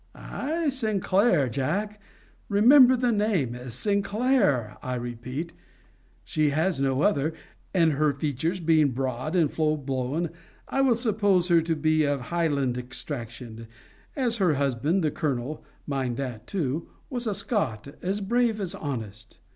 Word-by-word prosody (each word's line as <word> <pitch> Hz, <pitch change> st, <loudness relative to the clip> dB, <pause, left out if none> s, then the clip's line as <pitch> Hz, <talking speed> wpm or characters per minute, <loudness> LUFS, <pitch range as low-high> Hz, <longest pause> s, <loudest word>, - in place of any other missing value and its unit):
Ay, 320 Hz, +3 st, -3 dB
SINCLAIR, 205 Hz, -, +2 dB
Jack! 195 Hz, -, -2 dB, 0.5 s
Remember 250 Hz, +5 st, +7 dB
the 245 Hz, -1 st, +1 dB
name! 205 Hz, -, 0 dB
SINCLAIR, 200 Hz, -, +1 dB
I 125 Hz, 0 st, -3 dB
repeat. 125 Hz, +7 st, -5 dB, 0.7 s
She 155 Hz, -1 st, +1 dB
has 160 Hz, +1 st, 0 dB
no 135 Hz, +1 st, +1 dB
other. 160 Hz, -5 st, +1 dB, 0.4 s
And 165 Hz, -4 st, +3 dB
her 150 Hz, +1 st, +2 dB
features 150 Hz, +5 st, -2 dB
being 155 Hz, -5 st, +3 dB
broad 130 Hz, +5 st, -2 dB
and 160 Hz, -5 st, +3 dB
full 155 Hz, -1 st, +1 dB
blown, 135 Hz, +4 st, -2 dB, 0.4 s
I 270 Hz, -, 0 dB
will 260 Hz, -3 st, +4 dB
suppose 205 Hz, -6 st, +2 dB
her 170 Hz, -1 st, +5 dB
to 165 Hz, 0 st, -1 dB
be 155 Hz, 0 st, +2 dB
of 145 Hz, -1 st, +1 dB
Highland 140 Hz, -7 st, 0 dB
extraction; 120 Hz, -3 st, -4 dB, 0.5 s
as 245 Hz, -4 st, 0 dB
her 180 Hz, -7 st, +2 dB
husband 140 Hz, +6 st, 0 dB
the 155 Hz, -, +1 dB
colonel 140 Hz, 0 st, -3 dB, 0.2 s
[mind 130 Hz, -4 st, -2 dB
that 125 Hz, -5 st, -5 dB
too] 160 Hz, -4 st, -2 dB, 0.2 s
was 245 Hz, -2 st, -3 dB
a 210 Hz, -, 0 dB
Scot, 200 Hz, -, -2 dB
as 195 Hz, +3 st, -2 dB
brave, 230 Hz, +1 st, +1 dB
as 190 Hz, -4 st, -3 dB
honest. 110 Hz, -7 st, -6 dB
155 Hz, 140 wpm, -26 LUFS, 130-200 Hz, 0.7 s, Remember